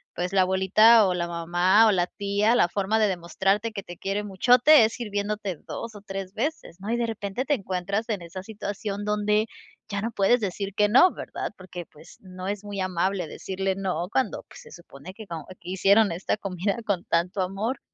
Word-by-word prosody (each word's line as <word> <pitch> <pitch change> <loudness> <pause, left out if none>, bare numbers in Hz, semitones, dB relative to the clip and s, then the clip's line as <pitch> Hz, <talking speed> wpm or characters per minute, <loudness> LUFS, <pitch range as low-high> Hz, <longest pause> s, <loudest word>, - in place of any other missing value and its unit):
pues, 180 +1 -2
la 190 -1 +4
abuelita, 200 +4 +5
o 185 - +1
la 170 -1 -2
mamá, 175 +5 +3
o - - +5
la 180 -3 +1
tía, 205 +4 +1
la 175 - +3
forma 205 +4 0
de 215 - +3
demostrarte 195 +5 -1
que 200 - -5
te 175 -1 -10
quiere 200 +2 -2
muchote, 245 +7 +5
es 225 - -2
sirviéndote 205 -4 -3
2 230 -1 -6
o 205 - -10
3 195 -1 -6
veces, 250 - -4
¿no?, 200 - -7
y 235 - +1
de 240 -1 0
repente, 215 +2 -3
te 290 - 0
encuentras 200 -1 -2
en 210 -5 -2
esa 180 +2 -8
situación, 205 -1 -5
donde 210 +1 +1 0.4
ya 200 -1 -2
no 230 +2 -2
puedes 205 +4 +3
decir 200 -1 -3
que 210 0 +4
no, 265 - +6
¿verdad?, - - -5
porque 180 -2 -8
pues, 150 - -17
no 185 -1 -8
es 205 0 -3
muy 205 -1 -6
amable 185 0 -1
decirle 190 +4 -3
no, 185 -3 -2
cuando 265 - -1
pues, - - -13
se 465 - -15
supone 175 0 -12
que 215 +1 -11
co 165 -2 -6
que 175 -1 -10
hicieron 195 +1 +4
esta 180 +5 -2
comida 195 +1 -2
con 195 -5 -1
tanto 180 +4 0
amor, 195 +7 -2
200 Hz, 205 wpm, -25 LUFS, 185-215 Hz, 0.4 s, no